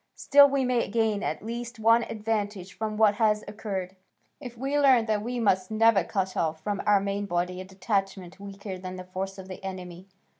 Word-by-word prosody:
Still 285 0 +6
we 275 -1 +1
may 245 -2 +1
gain 220 -1 0
at 155 +6 -3
least 235 +1 -5
one 230 +2 +5
advantage 210 -3 -3
from 215 -1 -4
what 215 -2 +5
has 210 -1 +3
occurred, 195 -3 -5 0.4
if 245 -4 -9
we 270 +4 -2
learn 260 -5 +5
that 215 -2 0
we 245 +3 -3
must 190 -4 +1
never 220 -3 +4
cut 190 +1 -2
off 160 -1 -1
from 200 +4 -3
our 205 -1 +5
main 200 +1 -3
body 180 0 -2
a - - -8
detachment 195 -1 -3
weaker 200 -1 -7
than 185 0 -7
the 185 - -7
force 190 +1 -5
of 190 -1 -9
the 185 0 -9
enemy. 185 -1 -7
200 Hz, 195 wpm, -27 LUFS, 185-225 Hz, 0.4 s, Still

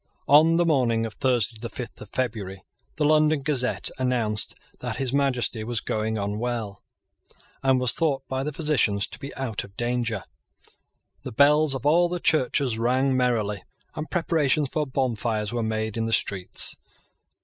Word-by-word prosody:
On 160 +3 +6
the 175 - +3
morning 120 -8 +2
of 110 - -6
Thursday 125 -4 +1
the 115 - -4
fifth 125 0 -8
of 105 - -10
February, 105 -7 -3 0.3
the 150 - 0
London 155 -1 +3
Gazette 135 -4 0
announced 120 -5 -1 0.2
that - - -4
His 130 -1 -2
Majesty 125 -5 0
was 120 0 -2
going 110 0 -2
on 100 +1 -3
well, 115 -4 -3 0.8
and 135 -1 +3
was 125 -2 +4
thought 140 -5 0
by 130 0 -2
the 150 +3 -3
physicians 135 -10 +1
to - - -10
be 140 - -7
out 125 -6 -3
of 100 +1 -15
danger. 120 -4 -1 1.0
The - - -7
bells 145 +3 +4
of 130 - -6
all 170 +4 +4
the 180 0 -3
churches 135 -7 +2
rang 130 +3 +2
merrily; 110 -6 0 0.3
and 155 +1 -6
preparations 155 -5 +1
for 150 -1 -1
bonfires 115 -5 -1
were 120 - -1
made 110 -1 -2
in 115 0 -1
the 115 - -1
streets. 95 -5 0
125 Hz, 165 wpm, -25 LUFS, 110-140 Hz, 1.0 s, On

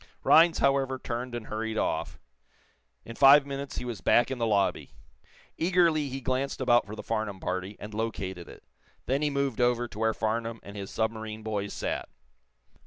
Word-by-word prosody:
Rhinds, 165 +1 +6
however, 135 -1 +2
turned 120 0 -5
and 120 -2 -5
hurried 110 0 -4
off. - - -2 0.9
In 115 - -8
five 140 +2 +7
minutes 140 0 -6
he - - -4
was 120 -4 -5
back 120 +2 +3
in 130 - -3
the 115 - +1
lobby. 100 -3 0 0.7
Eagerly 165 -4 +2
he 135 +1 -5
glanced 130 +2 -2
about 120 -5 +3
for 105 - -7
the - - -8
Farnum 110 -3 -3
party, 95 +2 -4
and 105 +1 -8
located 95 -6 -4
it. - - -13 0.4
Then 135 +4 0
he 150 - +2
moved 140 -4 -1
over 120 0 +2
to 110 - -10
where 110 0 +1
Farnum 115 +1 -2
and 100 - -10
his 100 -1 -6
submarine 110 -1 -3
boys 105 -2 -3
sat. - - -3
115 Hz, 175 wpm, -28 LUFS, 110-135 Hz, 0.9 s, five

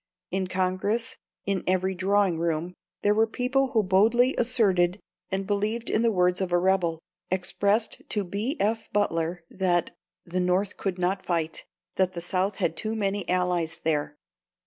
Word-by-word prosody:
In 190 0 -1
Congress, 190 +6 -1 0.3
in 195 -2 -1
every 185 +1 +1
drawing 190 -2 +2
room, 170 +1 -1 0.3
there 205 - +4
were 220 +1 +3
people 260 +4 0
who 220 -2 +3
boldly 225 +7 +4
asserted 200 -7 +2 0.3
and 195 +1 -2
believed 210 +3 -1
in 215 - +2
the 230 -1 +3
words 180 -1 +2
of 185 -2 -2
a 175 - +4
rebel, 175 -3 +1 0.3
expressed 200 +4 0
to 210 - 0
B. 210 - -3
F. 220 +2 0
Butler 170 -4 0
that 180 -2 0 0.3
"the 180 +1 -2
North 180 +2 +1
could 190 -2 -3
not 185 +2 0
fight; 165 -2 -2 0.3
that 185 -1 +2
the 170 - -4
South 185 +3 0
had - - 0
too 220 0 -3
many 200 -2 -1
allies 180 -3 0
there." 150 -2 -1
190 Hz, 160 wpm, -26 LUFS, 180-210 Hz, 0.3 s, there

